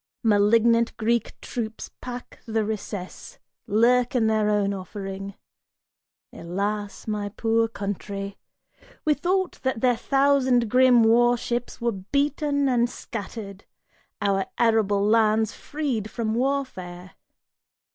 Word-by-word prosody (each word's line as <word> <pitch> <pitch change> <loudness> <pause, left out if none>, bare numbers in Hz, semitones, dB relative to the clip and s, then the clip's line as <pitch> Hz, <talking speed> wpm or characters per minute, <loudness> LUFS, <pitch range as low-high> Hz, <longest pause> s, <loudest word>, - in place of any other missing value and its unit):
Malignant 230 +2 +3
Greek 235 0 -1
troops 225 -2 -5
pack 245 -1 -8
the 220 -1 0
recess, 205 -3 -6 0.3
lurk 245 +4 +3
in 235 -3 +3
their 215 -1 +2
own 205 -1 +1
offering. 195 0 -6 1.0
Alas 200 +4 -4
my 210 -1 -2
poor 225 +2 +1
country! 200 -2 -5 0.7
We 305 - +4
thought 365 +5 -1
that 260 -4 -1
their 250 -1 +3
thousand 260 -2 +2
grim 250 -2 +6
war 240 +2 +4
ships 240 +1 -3
Were 235 0 0
beaten 280 +7 0
and 240 -2 +2
scattered, 205 -4 -7 0.6
our 195 -1 +1
arable 215 -4 +2
lands 220 0 +3
freed 265 -9 -3
from 220 -2 -2
warfare! 225 -9 -3
225 Hz, 110 wpm, -25 LUFS, 205-245 Hz, 1.0 s, grim